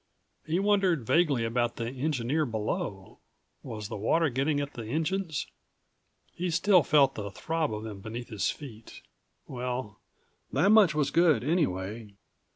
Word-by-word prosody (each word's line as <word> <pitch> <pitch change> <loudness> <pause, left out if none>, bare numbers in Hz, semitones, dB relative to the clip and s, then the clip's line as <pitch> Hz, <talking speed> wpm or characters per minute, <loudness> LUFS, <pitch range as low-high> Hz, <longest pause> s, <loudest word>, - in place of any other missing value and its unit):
He 160 +2 +1
wondered 195 - +2
vaguely 145 -5 +2
about 120 +1 0
the 115 - -3
engineer 135 +2 -1
below. 105 -5 -4 0.4
Was 105 -2 -6
the - - -6
water 155 +10 +2
getting 140 +4 0
at 140 0 -4
the 115 -2 -7
engines? 160 - -1 0.9
He 180 +1 -2
still 180 +3 +4
felt 140 -2 +4
the 100 -1 -5
throb 160 +8 -2
of 105 0 -4
them 105 -3 -7
beneath 115 +3 -7
his 105 -4 -1
feet. 115 -7 -9 0.4
Well, 125 -4 -5 0.5
that 195 - +3
much 205 -8 +6
was 145 -2 +1
good 160 -8 +4
anyway. 110 - -1
135 Hz, 145 wpm, -28 LUFS, 110-160 Hz, 0.9 s, much